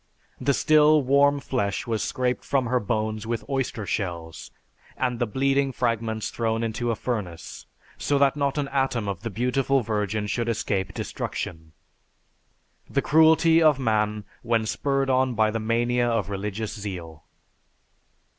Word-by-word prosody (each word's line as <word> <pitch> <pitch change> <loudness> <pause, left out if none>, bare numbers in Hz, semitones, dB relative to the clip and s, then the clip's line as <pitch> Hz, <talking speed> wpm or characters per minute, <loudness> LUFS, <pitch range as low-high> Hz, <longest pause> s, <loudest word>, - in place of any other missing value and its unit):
The 135 +1 +1
still 155 -1 +5
warm 140 +2 +4
flesh 120 -7 -2
was 115 -2 -1
scraped 125 -1 -1
from 135 -2 0
her 125 +2 +1
bones 110 0 -2
with 115 -1 -3
oyster 130 -6 -2
shells, 85 -5 -4 0.5
and 125 -2 -1
the 120 - +1
bleeding 135 +3 +1
fragments 115 -3 -1
thrown 115 0 -1
into 115 +1 -2
a 115 - +1
furnace, 105 -8 -5 0.3
so 145 - +1
that 140 0 +3
not 140 0 -1
an 145 -1 0
atom 135 -6 0
of 95 -3 -4
the 115 - -4
beautiful 125 +5 +1
virgin 105 -1 -2
should 115 +3 -1
escape 100 -4 -2
destruction." 80 -2 -5 1.2
The 140 - 0
cruelty 160 +1 +5
of 155 -4 +5
man 105 -4 0 0.2
when 115 -2 +1
spurred 135 +3 0
on 130 -1 +2
by 110 0 +3
the 115 - -2
mania 120 +2 +1
of 105 -4 -1
religious 105 +2 -4
zeal! 90 -7 -7
115 Hz, 145 wpm, -25 LUFS, 105-135 Hz, 1.2 s, still